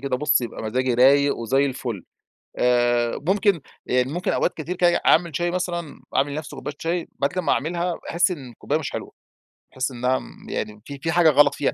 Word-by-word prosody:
كده 135 -2 -1
بُصّ، 150 +1 +2
يبقى 120 -2 -6
مزاجي 125 +3 0
رايق 140 +3 +5
وزي 135 +5 +1
الفل. 120 -8 -4 0.5
آآ، 120 -1 +2
ممكن 195 -4 +2 0.2
يعني 125 +2 +1
ممكن 175 +2 -1
أوقات - - +1
كتير 165 +4 -4
كده، 175 -1 +3
أعمل 165 -3 +4
شاي 175 0 0
مثلًا 175 -4 -3
أعمل 140 +1 +2
لنفسي 150 -1 -6
كوباية 135 +2 -6
شاي، 170 +1 -2
بعد 140 - +2
كده 185 - -2
أما - - 0
أعملها 170 +3 -1
باحس 175 +2 0
إن 135 -7 -6
الكوباية 145 +6 -2
مش 140 - -4
حلوة، - - -6 0.6
باحس 130 +1 -2
إنها 125 +1 0
مم - - -13
يعني 105 0 -4
في 140 -1 -8
في 160 +3 -1
حاجة 170 -2 +5
غلط 145 -1 +5
فيها، 145 - 0
140 Hz, 200 wpm, -23 LUFS, 125-170 Hz, 0.6 s, رايق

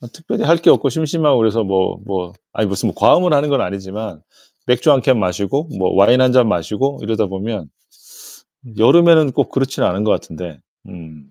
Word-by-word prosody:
뭐 120 - -12
특별히 165 - -5
할 165 +2 +4
게 165 - +4
없고 140 - +3
심심하고 155 -1 0
그래서 110 0 +1
뭐 95 -1 -1
뭐 90 -3 -5 0.2
아니 110 - -1
무슨 100 -1 -2
뭐 - - -6
과음을 180 -2 +3
하는 145 +1 +1
건 140 - 0
아니지만 100 -3 -6 0.4
맥주 125 +5 +2
1 135 - +2
캔 125 0 +2
마시고 100 - -2
뭐 95 - -1
와인 110 +7 +4
1 130 -1 +3
잔 125 -3 +3
마시고 105 - -2
이러다 110 -1 -1
보면 95 -3 -6 1.1
여름에는 160 +3 +5
꼭 - - -1
그렇진 135 0 -2
않은 95 +4 -1
것 110 - 0
같은데 80 -2 -5 0.3
음 80 -5 -14
110 Hz, 345 characters per minute, -17 LUFS, 95-140 Hz, 1.1 s, 여름에는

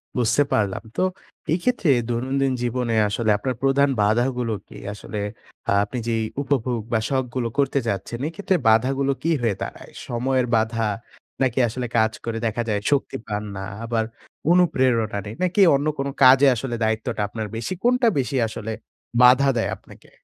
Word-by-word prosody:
বুঝতে 125 +4 +3
পারলাম। 100 -3 0
তো - - +2 0.5
এইক্ষেত্রে 185 +1 +1 0.2
দৈনন্দিন 130 +3 0
জীবনে 120 -1 -1
আসলে 110 +2 -1
আপনার 130 +4 -3
প্রধান 140 +1 +3
বাধাগুলো 120 +2 +1
কি? - - -12 0.2
আসলে 105 0 -6 0.5
আ - - +3
আপনি 105 +5 -5
যেই 115 -1 0 0.2
উপভোগ 130 -4 0
বা 110 - +3
শখগুলো 130 -3 -1
করতে 140 0 +2
যাচ্ছেন 100 +3 -3
এই 160 - -4
ক্ষেত্রে 200 -2 0
বাধাগুলো 135 +5 +2
কি 165 - +1
হয়ে 115 -4 +1
দাঁড়ায়? - - -7 0.2
সময়ের 125 +1 0
বাধা, 110 0 +1 0.5
নাকি 130 -1 +1
আসলে 125 +2 -4
কাজ 110 0 +3
করে 115 -1 -2
দেখা 115 +1 -1
যায় 105 -1 0
শক্তি 140 -1 0
পান 105 0 -3
না, 95 - -5 0.2
আবার 115 -1 0 0.5
অনুপ্রেরণা 130 - +2
নেই 105 +2 -7
নাকি 185 +3 +2
অন্য 145 +2 0
কোনো 140 0 -2
কাজে 130 +2 +8
আসলে 120 +1 -3
দায়িত্বটা 110 -1 -1
আপনার 110 +1 -5
বেশি, 115 +11 -3
কোনটা 250 0 +3
বেশি 135 +1 -1
আসলে 110 0 -6 0.5
বাধা 130 +3 +6
দেয় 115 - 0
আপনাকে? - - -18
125 Hz, 160 wpm, -23 LUFS, 110-135 Hz, 0.5 s, কাজে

